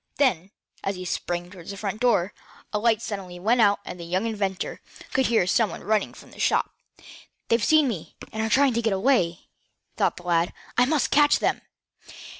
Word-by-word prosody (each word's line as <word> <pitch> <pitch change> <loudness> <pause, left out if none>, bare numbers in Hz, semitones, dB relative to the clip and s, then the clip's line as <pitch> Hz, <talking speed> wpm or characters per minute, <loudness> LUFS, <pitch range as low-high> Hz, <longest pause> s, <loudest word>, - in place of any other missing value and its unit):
Then, 195 - +1 0.3
as 195 - -1
he 185 0 -7
sprang 175 0 -3
toward 180 -3 -12
the 200 - -6
front 210 +2 -4
door, 205 -6 +2 0.4
the 210 - 0
light 225 0 +2
suddenly 185 -4 -6
went 230 +6 +2
out, 205 -1 +4
and 180 - -7
the - - -6
young 180 +5 -1
inventor 205 -4 -3 0.3
could 265 -1 +2
hear 225 -6 +3
some 210 +4 +2
one - - -8
running 215 +1 0
from - - -15
the - - -15
shop. - - +1 0.8
"They've 230 -1 +2
seen 310 +1 +5
me, 200 -10 -5 0.2
and 220 - -2
are 220 - -1
trying 265 +3 +4
to 235 - 0
get 225 -3 +1
away," 190 -6 +2 0.6
thought - - +1
the 180 - -10
lad. 170 -1 +1 0.2
"I 250 - +5
must 295 +1 +1
catch 290 0 +5
them!" - - 0
210 Hz, 200 wpm, -25 LUFS, 180-235 Hz, 0.8 s, seen